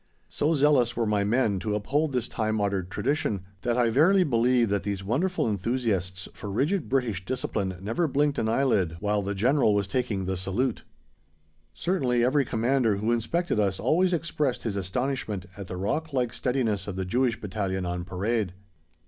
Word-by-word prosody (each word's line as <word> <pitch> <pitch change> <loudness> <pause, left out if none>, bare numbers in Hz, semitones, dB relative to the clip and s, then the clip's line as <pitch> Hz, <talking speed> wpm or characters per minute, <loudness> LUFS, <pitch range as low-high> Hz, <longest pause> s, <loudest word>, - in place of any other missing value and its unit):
So 155 +3 +1
zealous 140 -5 +3
were 115 - 0
my 105 -1 +1
men 105 -2 +1
to 105 +1 -2
uphold 145 +9 0
this 125 -3 -1
time 110 -1 -1
honoured 100 -3 -1
tradition, 110 -4 -1 0.2
that 120 0 0
I 120 -2 +3
verily 180 - +5
believe 120 - +2
that 100 -1 +1
these 100 -1 -3
wonderful 160 - 0
enthusiasts 100 -4 -1
for 105 - -7
rigid 145 - 0
British 120 -9 0
discipline 100 -4 -2
never 115 - 0
blinked 145 +1 +1
an 110 - 0
eyelid 110 -10 +1
while 105 +1 0
the 100 +1 -3
General 120 +1 +3
was 100 -2 0
taking 105 -4 -1
the 95 0 -2
salute. 105 +7 -1 0.9
Certainly 130 -10 +1
every 135 +3 +3
Commander 115 -1 +1
who 105 +4 0
inspected 120 +6 0
us 100 -2 +1
always 180 +3 +2
expressed 150 -6 -1
his 110 -4 -2
astonishment 105 0 -2
at 100 -2 -8
the 90 - -5
rock 155 - -2
like 125 -3 0
steadiness 115 -7 -1
of 100 - -4
the 95 0 -2
Jewish 120 +5 +1
Battalion 95 -2 -2
on 90 0 -3
parade. 95 +2 -1
115 Hz, 175 wpm, -27 LUFS, 100-130 Hz, 0.9 s, verily